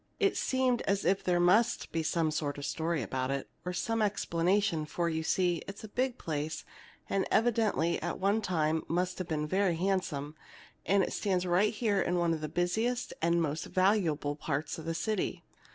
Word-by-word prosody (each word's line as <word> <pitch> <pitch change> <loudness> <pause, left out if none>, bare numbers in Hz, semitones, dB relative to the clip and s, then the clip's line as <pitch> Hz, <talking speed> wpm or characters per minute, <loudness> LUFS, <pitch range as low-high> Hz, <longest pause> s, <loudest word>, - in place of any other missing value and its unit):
It 400 -2 +3
seemed 260 -2 +1
as 200 0 +1
if 190 +3 +2
there 175 -1 +2
must 185 +7 +3
be 165 - 0
some 160 0 +1
story 150 +1 -2
about 130 +4 -2
it, 140 0 -2 0.2
or 180 - -3
some 225 +5 -1
explanation; 195 -2 +1
for, 170 +2 -1
you 160 -1 -1
see, 175 0 +1
it's 195 +2 -8
a - - -6
big 255 +3 -1
place, 155 0 -3 0.4
and 195 -1 0
evidently 215 -7 +2
at 175 - -3
one 200 +3 +2
time 160 -5 +1
must 180 +2 -1
have 185 - -3
been 150 -2 -1
very 185 +2 +1
handsome. 170 -5 -1 0.5
And 195 0 +4
it - - -2
stands 185 -3 0
right 185 +4 +3
here 210 -3 +1
in 175 +1 0
one 170 -1 +2
of 160 - -3
the 155 - -3
busiest 220 +9 0
and 170 +1 +3
most 155 0 -2
valuable 180 -7 +1
parts 150 +1 -3
of 160 - -8
the 165 0 -2
city. 215 +3 -2
175 Hz, 185 wpm, -31 LUFS, 160-200 Hz, 0.5 s, And